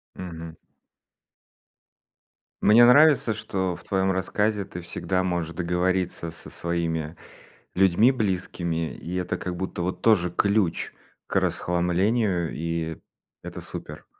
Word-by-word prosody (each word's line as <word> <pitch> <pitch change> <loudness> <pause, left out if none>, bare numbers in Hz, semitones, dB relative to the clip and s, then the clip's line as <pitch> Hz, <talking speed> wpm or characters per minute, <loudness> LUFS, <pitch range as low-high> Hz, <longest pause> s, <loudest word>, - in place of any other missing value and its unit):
Мгм. 85 -3 -8 2.1
Мне 115 +3 +7
нравится, 140 -2 +6
что 95 -4 -2
в - - -14
твоем 95 0 +1
рассказе 105 +3 0
ты 90 -3 -8
всегда 95 +2 -2
можешь 85 -3 -2
договориться 90 0 -1
со 85 - -10
своими 85 -2 -3 0.6
людьми 95 +7 +4
близкими, 90 -7 -2
и 85 - -7
это, 90 -1 -2
как 90 -1 -5
будто, 95 -1 -4
вот 90 +1 -3
тоже 90 -6 +4
ключ 100 0 +1 0.3
к - - -4
расхламлению. 90 +1 0
И 80 0 -3 0.4
это - - -7
супер. - - -8
90 Hz, 115 wpm, -25 LUFS, 85-100 Hz, 2.1 s, Мне